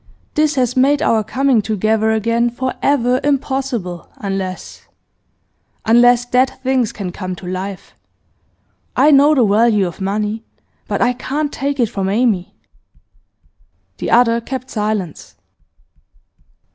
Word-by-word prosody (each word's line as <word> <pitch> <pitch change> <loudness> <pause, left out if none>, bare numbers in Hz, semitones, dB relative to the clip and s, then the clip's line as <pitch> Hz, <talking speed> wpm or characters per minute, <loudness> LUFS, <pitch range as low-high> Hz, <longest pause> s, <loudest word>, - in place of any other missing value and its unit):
This 305 -1 +1
has 250 -1 0
made 280 +3 +3
our 220 -1 +2
coming 255 +1 +1
together 220 +1 0
again 230 +2 +1
for 255 +2 -3
ever 255 -3 +2
impossible, 265 - -2
unless 195 -2 -5 1.0
unless 245 +1 +5
dead 250 +1 +2
things 255 -3 +1
can 190 -4 -6
come 185 0 -5
to 180 - -12
life. 185 +1 -6 1.0
I 300 - +5
know 290 +2 +5
the 250 -5 +4
value 210 0 +3
of 175 +2 -7
money, 210 +3 -2 0.4
but - - 0
I 245 0 +2
can't 285 +4 -3
take 280 0 -3
it 240 - +4
from 195 -2 -3
Amy.' 210 -4 0 1.4
The - - -3
other 235 0 +4
kept 255 +1 -6
silence. 210 -6 -3
235 Hz, 125 wpm, -17 LUFS, 205-260 Hz, 1.4 s, unless